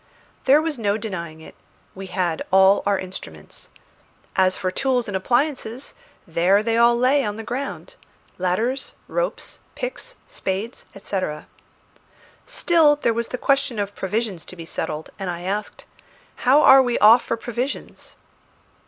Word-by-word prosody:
There 285 Hz, +4 st, +5 dB
was 315 Hz, -5 st, -3 dB
no 205 Hz, -1 st, +1 dB
denying 170 Hz, -7 st, -6 dB
it. -, -, -12 dB, 0.4 s
We 195 Hz, 0 st, -8 dB
had 180 Hz, -3 st, -1 dB
all 190 Hz, +1 st, +5 dB
our 200 Hz, -1 st, +3 dB
instruments. 85 Hz, -, -8 dB, 0.7 s
As 185 Hz, -1 st, +3 dB
for 185 Hz, -1 st, -2 dB
tools 250 Hz, +2 st, 0 dB
and 200 Hz, -, -4 dB
appliances, 250 Hz, +3 st, -1 dB, 0.3 s
there 180 Hz, +5 st, +2 dB
they 225 Hz, 0 st, 0 dB
all 235 Hz, +1 st, +5 dB
lay 265 Hz, +3 st, +3 dB
on 210 Hz, -1 st, -2 dB
the 225 Hz, -, -6 dB
ground 270 Hz, -, -5 dB, 0.5 s
ladders, 220 Hz, +9 st, -1 dB
ropes, -, -, -3 dB, 0.2 s
picks, -, -, -5 dB
spades, 200 Hz, +6 st, -4 dB
etc. 185 Hz, -6 st, -4 dB, 1.0 s
Still 335 Hz, -11 st, +4 dB
there 260 Hz, -5 st, 0 dB
was 235 Hz, +1 st, -2 dB
the 250 Hz, -, -4 dB
question 275 Hz, -2 st, +1 dB
of 205 Hz, 0 st, -2 dB
provisions 200 Hz, -3 st, -3 dB
to -, -, -9 dB
be 165 Hz, -2 st, -9 dB
settled, 155 Hz, -1 st, -5 dB
and 190 Hz, -2 st, -3 dB
I 175 Hz, -1 st, -4 dB
asked 200 Hz, +3 st, -4 dB, 0.5 s
"How 275 Hz, +4 st, +4 dB
are 270 Hz, 0 st, +9 dB
we 245 Hz, -2 st, 0 dB
off 225 Hz, +3 st, +7 dB
for 230 Hz, -, -2 dB
provisions?" 245 Hz, +4 st, -5 dB
220 Hz, 145 wpm, -22 LUFS, 185-260 Hz, 1.0 s, are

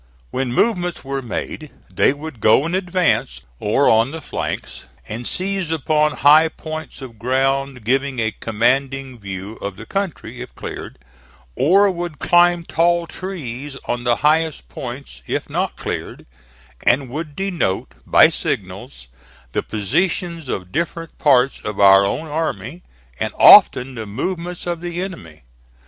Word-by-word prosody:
When 130 Hz, -1 st, -2 dB
movements 180 Hz, -, 0 dB
were 135 Hz, 0 st, -3 dB
made, 145 Hz, +5 st, -5 dB, 0.2 s
they -, -, +3 dB
would 145 Hz, -2 st, -8 dB
go 110 Hz, +7 st, +4 dB
in 165 Hz, -, -3 dB
advance, 180 Hz, -, 0 dB, 0.2 s
or 110 Hz, +7 st, +2 dB
on 115 Hz, +2 st, +4 dB
the 160 Hz, +3 st, -6 dB
flanks, -, -, -5 dB, 0.2 s
and 115 Hz, +2 st, -5 dB
seize 190 Hz, -2 st, -2 dB
upon 150 Hz, -1 st, +1 dB
high 155 Hz, +3 st, +6 dB
points 155 Hz, -3 st, -8 dB
of 115 Hz, -4 st, -11 dB
ground 135 Hz, +1 st, 0 dB
giving 135 Hz, +2 st, +1 dB
a 110 Hz, -2 st, 0 dB
commanding 130 Hz, +4 st, -1 dB
view 100 Hz, +1 st, -7 dB
of 100 Hz, -1 st, -5 dB
the 115 Hz, -, -9 dB
country, 195 Hz, -, -4 dB
if -, -, -9 dB
cleared, -, -, -7 dB, 0.6 s
or 195 Hz, +8 st, +4 dB
would 175 Hz, -3 st, -5 dB
climb 175 Hz, +1 st, +4 dB
tall 170 Hz, +1 st, +2 dB
trees 145 Hz, -8 st, -6 dB
on 120 Hz, 0 st, -2 dB
the 120 Hz, -1 st, +2 dB
highest 155 Hz, -, +1 dB
points 60 Hz, 0 st, -8 dB
if -, -, -2 dB
not -, -, -1 dB
cleared, -, -, -5 dB, 0.6 s
and 130 Hz, +2 st, +3 dB
would 150 Hz, +2 st, -6 dB
denote, 180 Hz, -, -2 dB
by -, -, +6 dB
signals, -, -, -4 dB, 0.4 s
the -, -, 0 dB
positions 165 Hz, -, -1 dB
of 90 Hz, -5 st, -4 dB
different 165 Hz, 0 st, -3 dB
parts 135 Hz, -2 st, +3 dB
of 105 Hz, -1 st, -5 dB
our 95 Hz, 0 st, +7 dB
own 125 Hz, +10 st, -1 dB
army, 160 Hz, 0 st, -3 dB, 0.4 s
and -, -, -2 dB
often 130 Hz, +1 st, +7 dB
the 110 Hz, -3 st, -6 dB
movements 175 Hz, -, -4 dB
of 175 Hz, -1 st, -3 dB
the 175 Hz, 0 st, -4 dB
enemy. 85 Hz, -, -7 dB
140 Hz, 145 wpm, -20 LUFS, 120-170 Hz, 0.6 s, our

